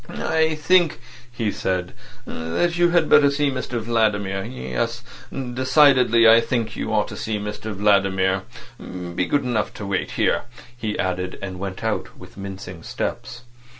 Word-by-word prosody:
"I 160 Hz, 0 st, +1 dB
think," 170 Hz, -1 st, +3 dB, 0.3 s
he 115 Hz, -3 st, -2 dB
said, 90 Hz, -2 st, -2 dB, 0.3 s
"that 85 Hz, -, -1 dB
you 175 Hz, 0 st, +4 dB
had 170 Hz, -2 st, +3 dB
better 140 Hz, -, +6 dB
see 140 Hz, 0 st, +1 dB
Mr 130 Hz, -2 st, -3 dB
Vladimir. 105 Hz, -4 st, 0 dB
Yes, 65 Hz, -3 st, -4 dB, 0.3 s
decidedly 130 Hz, -2 st, +4 dB
I 115 Hz, +1 st, +8 dB
think 115 Hz, -2 st, -2 dB
you -, -, -3 dB
ought -, -, +1 dB
to -, -, -7 dB
see 110 Hz, -1 st, -3 dB
Mr 105 Hz, +1 st, -5 dB
Vladimir. 95 Hz, -2 st, +2 dB, 0.4 s
Be 90 Hz, -1 st, -4 dB
good 145 Hz, -1 st, +1 dB
enough 120 Hz, -4 st, -1 dB
to 105 Hz, -, -6 dB
wait 100 Hz, -1 st, -2 dB
here," -, -, +1 dB, 0.3 s
he 110 Hz, -3 st, -3 dB
added, 90 Hz, -1 st, -2 dB
and 95 Hz, -2 st, -6 dB
went 95 Hz, 0 st, -5 dB
out 110 Hz, -1 st, -3 dB
with -, -, -14 dB
mincing 95 Hz, -3 st, -8 dB
steps. 120 Hz, +7 st, -5 dB
110 Hz, 150 wpm, -22 LUFS, 95-130 Hz, 0.4 s, I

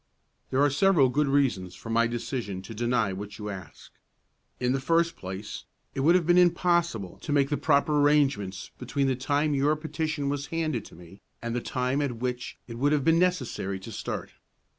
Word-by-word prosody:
"There 135 Hz, +2 st, +2 dB
are 145 Hz, -, +5 dB
several 150 Hz, -3 st, +4 dB
good 145 Hz, +3 st, +1 dB
reasons 125 Hz, -11 st, +1 dB
for 115 Hz, -, -8 dB
my 115 Hz, +1 st, +3 dB
decision 115 Hz, -5 st, -4 dB
to 115 Hz, -, -8 dB
deny 115 Hz, -3 st, 0 dB
what 105 Hz, +2 st, -7 dB
you 105 Hz, -1 st, -5 dB
ask. 95 Hz, -2 st, -10 dB, 0.7 s
In 125 Hz, 0 st, +1 dB
the 135 Hz, -, 0 dB
first 165 Hz, +4 st, +2 dB
place, 95 Hz, +2 st, -7 dB, 0.3 s
it -, -, -4 dB
would 160 Hz, +6 st, +5 dB
have 180 Hz, -3 st, +3 dB
been 175 Hz, +2 st, +5 dB
impossible 170 Hz, -, +2 dB
to -, -, -5 dB
make 140 Hz, -1 st, +3 dB
the -, -, +3 dB
proper 145 Hz, 0 st, +2 dB
arrangements 135 Hz, -11 st, +1 dB
between 135 Hz, +2 st, -1 dB
the 135 Hz, -1 st, +1 dB
time 145 Hz, +4 st, 0 dB
your 145 Hz, +2 st, +2 dB
petition 155 Hz, -1 st, -3 dB
was 140 Hz, 0 st, -2 dB
handed 155 Hz, -8 st, -2 dB
to -, -, -13 dB
me 90 Hz, +3 st, -14 dB, 0.2 s
and 115 Hz, 0 st, -4 dB
the 120 Hz, -, -1 dB
time 130 Hz, +3 st, -1 dB
at 140 Hz, -4 st, -1 dB
which 125 Hz, +1 st, -4 dB
it 115 Hz, -1 st, -7 dB
would 145 Hz, +3 st, +3 dB
have 145 Hz, -2 st, +1 dB
been 165 Hz, +2 st, +4 dB
necessary 130 Hz, -, 0 dB
to -, -, -8 dB
start. -, -, -5 dB
135 Hz, 195 wpm, -27 LUFS, 115-150 Hz, 0.7 s, are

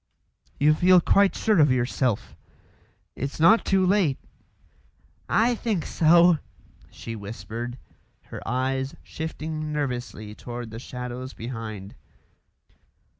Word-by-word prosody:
"You 150 Hz, +2 st, +5 dB
feel 180 Hz, +3 st, +5 dB
quite 200 Hz, +3 st, +3 dB
sure 215 Hz, -5 st, +2 dB
of 145 Hz, -3 st, +5 dB
yourself? 125 Hz, -2 st, 0 dB, 0.8 s
It's 140 Hz, +4 st, -5 dB
not 215 Hz, +9 st, +6 dB
too 190 Hz, -1 st, +2 dB
late 180 Hz, -8 st, +2 dB, 0.6 s
" -, -, -36 dB, 0.2 s
"I 245 Hz, -, +2 dB
think 215 Hz, -7 st, -2 dB
so," 170 Hz, 0 st, +5 dB, 0.5 s
she 115 Hz, -, -8 dB
whispered, 115 Hz, +3 st, -6 dB, 0.5 s
her -, -, -9 dB
eyes 130 Hz, +2 st, -1 dB
shifting 155 Hz, -1 st, -5 dB
nervously 125 Hz, -7 st, -4 dB
toward 120 Hz, 0 st, -7 dB
the 115 Hz, -, -7 dB
shadows 125 Hz, +1 st, -6 dB
behind. 110 Hz, -4 st, -7 dB
135 Hz, 110 wpm, -25 LUFS, 120-165 Hz, 0.8 s, not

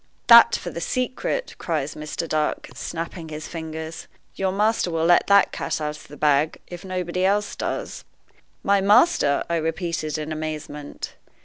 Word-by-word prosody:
"That 235 Hz, 0 st, +9 dB
for 175 Hz, -, -5 dB
the 170 Hz, -, -6 dB
secret!" 255 Hz, -, -2 dB
cries 155 Hz, -4 st, -2 dB
Mr. 155 Hz, +2 st, -5 dB
Dark, 155 Hz, -1 st, -1 dB
snapping 165 Hz, 0 st, -6 dB
his 155 Hz, 0 st, -6 dB
fingers. 160 Hz, -1 st, -6 dB, 0.3 s
"Your 190 Hz, -1 st, -1 dB
master 210 Hz, 0 st, +1 dB
will 165 Hz, -1 st, 0 dB
let 175 Hz, +1 st, +5 dB
the 200 Hz, 0 st, +6 dB
cat -, -, -3 dB
out 150 Hz, -1 st, -3 dB
of -, -, -14 dB
the 145 Hz, -, -12 dB
bag, 150 Hz, +1 st, +2 dB
if 175 Hz, -1 st, -9 dB
nobody 185 Hz, -1 st, -2 dB
else 205 Hz, +2 st, +1 dB
does." -, -, -4 dB, 0.6 s
"My 200 Hz, 0 st, +3 dB
master!" 205 Hz, -, +4 dB
I 170 Hz, -, 0 dB
repeated, 165 Hz, -1 st, -2 dB
in 155 Hz, 0 st, -5 dB
amazement. 155 Hz, -2 st, -6 dB
165 Hz, 155 wpm, -23 LUFS, 155-190 Hz, 0.6 s, That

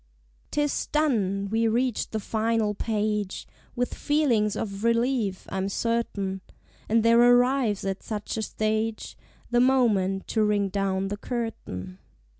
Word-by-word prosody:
_ -, -, -37 dB, 0.5 s
'Tis 295 Hz, -1 st, -1 dB
done! 205 Hz, -10 st, +1 dB
We 225 Hz, +1 st, +2 dB
reach 240 Hz, +1 st, 0 dB
the 220 Hz, -, -2 dB
final 220 Hz, 0 st, 0 dB
page, 210 Hz, -2 st, -2 dB, 0.3 s
With 245 Hz, 0 st, -1 dB
feelings 250 Hz, -9 st, +1 dB
of 200 Hz, -1 st, -4 dB
relief, 230 Hz, -4 st, +1 dB
I'm 190 Hz, +1 st, -2 dB
certain; 200 Hz, -4 st, -2 dB, 0.5 s
And 225 Hz, +1 st, +3 dB
there 230 Hz, +1 st, +6 dB
arrives 245 Hz, -3 st, +3 dB
at 195 Hz, 0 st, -2 dB
such 210 Hz, -2 st, -4 dB
a 220 Hz, -, -2 dB
stage, 220 Hz, +1 st, -2 dB, 0.4 s
The 240 Hz, 0 st, +4 dB
moment 215 Hz, -7 st, +2 dB
to 220 Hz, -, +1 dB
ring 205 Hz, -2 st, +1 dB
down 195 Hz, 0 st, -1 dB
the 205 Hz, -, -3 dB
curtain. 205 Hz, -, -5 dB
220 Hz, 135 wpm, -26 LUFS, 200-235 Hz, 0.5 s, there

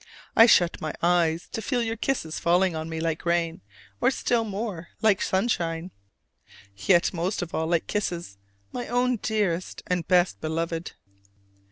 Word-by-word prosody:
I 225 Hz, -, +8 dB
shut 175 Hz, -6 st, +4 dB
my 155 Hz, -1 st, -3 dB
eyes 170 Hz, -1 st, +2 dB
to 225 Hz, -, -4 dB
feel 245 Hz, +1 st, 0 dB
your 225 Hz, 0 st, -2 dB
kisses 220 Hz, -10 st, -2 dB
falling 175 Hz, +1 st, +2 dB
on 160 Hz, +1 st, -4 dB
me 160 Hz, 0 st, -4 dB
like 165 Hz, -1 st, -2 dB
rain, 170 Hz, +1 st, 0 dB, 0.4 s
or 250 Hz, -, +5 dB
still 240 Hz, -3 st, +1 dB
more 200 Hz, -5 st, -4 dB, 0.2 s
like 210 Hz, -3 st, +4 dB
sunshine, 180 Hz, -4 st, 0 dB, 0.8 s
yet 170 Hz, -, +3 dB
most 175 Hz, +3 st, -1 dB
of 170 Hz, -, -8 dB
all 160 Hz, -, -1 dB
like 170 Hz, -1 st, +1 dB
kisses, 175 Hz, -, -3 dB, 0.3 s
my 245 Hz, -, -5 dB
own 245 Hz, +1 st, +1 dB
dearest 200 Hz, -5 st, -1 dB
and 180 Hz, -2 st, -1 dB
best 175 Hz, -, +3 dB
beloved! 165 Hz, +1 st, -3 dB
175 Hz, 155 wpm, -26 LUFS, 165-215 Hz, 0.8 s, I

